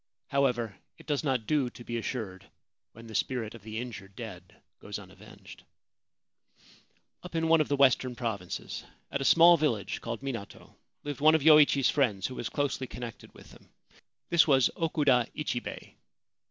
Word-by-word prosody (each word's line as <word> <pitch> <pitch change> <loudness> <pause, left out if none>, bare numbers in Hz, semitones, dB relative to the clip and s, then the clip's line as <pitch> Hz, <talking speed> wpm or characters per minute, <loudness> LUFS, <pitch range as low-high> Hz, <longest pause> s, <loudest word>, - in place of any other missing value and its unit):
However, 125 -6 0 0.2
it - - -16
does 145 -1 -1
not 130 -6 0
do 145 -3 +1
to 120 - -13
be 120 - -5
assured 110 -6 -5 0.4
while 115 +1 -13
the 110 - -10
spirit 115 -1 -2
of 115 - -12
the 110 +2 -7
injured 100 -5 -7
dead 95 -7 -10 0.2
goes - - -6
unavenged. - - -14 1.6
Up 180 -1 -10
in 165 0 +1
one 165 -1 +5
of 150 - 0
the 145 - +1
western 130 -2 +3
provinces, 110 -8 -4 0.3
at 140 - -2
a - - 0
small 170 +4 +7
village 115 - -1
called 115 0 -5
Minato, 115 -7 -7 0.3
lived 145 -2 -5
one 155 +1 +6
of 155 - +1
Yoichi's 150 -3 +6
friends, 110 -9 +1
who 130 - -3
was 120 -1 -4
closely 140 -2 -2
connected 120 -2 -9
with - - -15
him. - - -18 0.6
This 170 -2 +5
was 135 -4 +4
Okuda 145 -7 +2
Ichibei. 135 -5 -5
125 Hz, 165 wpm, -29 LUFS, 115-145 Hz, 1.6 s, small